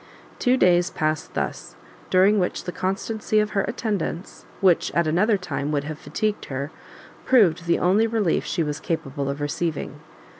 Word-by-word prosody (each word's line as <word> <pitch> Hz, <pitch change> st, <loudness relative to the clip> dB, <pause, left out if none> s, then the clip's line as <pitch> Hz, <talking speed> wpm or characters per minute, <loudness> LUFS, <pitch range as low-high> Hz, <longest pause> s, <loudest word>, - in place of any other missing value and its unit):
Two 250 Hz, +1 st, +3 dB
days 180 Hz, -4 st, +4 dB
passed 155 Hz, -2 st, -2 dB
thus, -, -, -4 dB, 0.3 s
during 195 Hz, +3 st, +4 dB
which 180 Hz, -, -1 dB
the 180 Hz, -, -4 dB
constancy 215 Hz, +4 st, -1 dB
of 210 Hz, 0 st, 0 dB
her 200 Hz, -, +1 dB
attendance, 205 Hz, -4 st, -4 dB
which 185 Hz, -4 st, +3 dB
at 170 Hz, -, +3 dB
another 195 Hz, +7 st, +2 dB
time 150 Hz, -5 st, -3 dB
would 145 Hz, -2 st, 0 dB
have 150 Hz, +1 st, -6 dB
fatigued 215 Hz, -1 st, -2 dB
her, 140 Hz, +2 st, -4 dB, 0.5 s
proved 180 Hz, -9 st, +3 dB
the 170 Hz, -, +3 dB
only 200 Hz, +6 st, +3 dB
relief 220 Hz, -6 st, +1 dB
she 170 Hz, -, -1 dB
was 150 Hz, -1 st, -3 dB
capable 140 Hz, -4 st, -3 dB
of 140 Hz, +1 st, -3 dB
receiving. 150 Hz, +2 st, -3 dB
180 Hz, 160 wpm, -24 LUFS, 155-210 Hz, 0.5 s, days